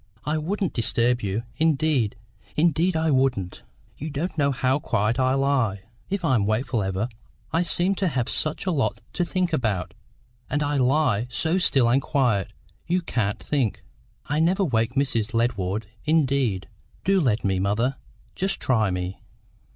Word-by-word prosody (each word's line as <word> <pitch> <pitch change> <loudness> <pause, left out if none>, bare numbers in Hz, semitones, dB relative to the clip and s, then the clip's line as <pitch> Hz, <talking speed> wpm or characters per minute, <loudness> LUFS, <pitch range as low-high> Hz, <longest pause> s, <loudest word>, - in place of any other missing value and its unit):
I 155 +1 0
wouldn't 190 +4 -2
disturb 120 +1 +1
you; 100 +3 -2
indeed, 155 -7 +2 0.4
indeed 165 +3 +2
I 160 0 +2
wouldn't! 130 -9 0 0.4
You 155 - -5
don't 155 +5 -3
know 145 -3 +2
how 135 +1 +1
quiet 115 -2 0
I 130 0 +3
lie. 130 -8 +1 0.3
If 195 -3 -2
I'm 120 -9 +2
wakeful 115 +1 0
ever 95 +3 -1 0.5
I 165 - +3
seem 180 +2 +1
to 190 - +1
have 130 -7 -1
such 155 +5 -1
a 185 - +1
lot 145 -6 0
to 175 - 0
think 180 -1 -1
about, 110 - -1 0.6
and 145 0 0
I 145 0 0
lie 125 -4 +2
so 160 +9 +1
still 135 -9 +3
and 130 +4 +3
quiet, 120 -10 +1 0.4
you 180 +1 +1
can't 110 -8 -1
think. 135 -8 -1 0.4
I 150 +2 -1
never 180 +5 +3
wake 115 -3 0
Mrs. 115 -6 0
Led 120 +2 +2
ward, 100 +3 -2 0.2
indeed. 140 - +1 0.4
Do 195 -1 +3
let 120 -6 +1
me, 95 -1 +1
mother; 115 +8 0 0.4
just 195 +1 0
try 110 -6 +2
me!" 90 +1 -4
130 Hz, 160 wpm, -24 LUFS, 110-155 Hz, 0.6 s, I